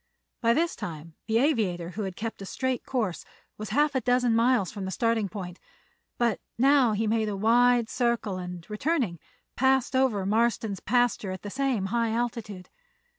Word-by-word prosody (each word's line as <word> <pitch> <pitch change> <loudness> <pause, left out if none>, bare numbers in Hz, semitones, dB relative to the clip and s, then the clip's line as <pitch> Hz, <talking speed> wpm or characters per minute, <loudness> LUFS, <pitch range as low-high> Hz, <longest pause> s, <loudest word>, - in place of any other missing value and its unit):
By 230 -1 +3
this 335 +1 +1
time 160 0 -7
the 220 0 +2
aviator, 205 - +1
who 215 - -5
had 190 -2 -5
kept 225 -2 -5
a - - -6
straight 260 +2 -2
course, 215 -10 -2 0.4
was 215 -1 -5
half 295 +6 +2
a 260 - 0
dozen 245 -1 +2
miles 230 -4 +2
from 200 -3 -6
the - - -3
starting 230 0 0
point; 180 -4 -7 0.6
but 235 -4 +1 0.2
now 265 -2 +4
he 215 +2 0
made 220 0 +1
a 200 - -3
wide 240 +2 +4
circle 235 -6 -1
and, 180 -2 -7
returning, 220 - -1 0.4
passed 265 0 +2
over 245 -7 +2
Marston's 220 -1 +1
pasture 245 -3 +1
at 185 -1 -6
the 205 - -6
same 260 -6 0
high 230 -1 +1
altitude. 225 -5 -4
225 Hz, 175 wpm, -27 LUFS, 195-245 Hz, 0.6 s, now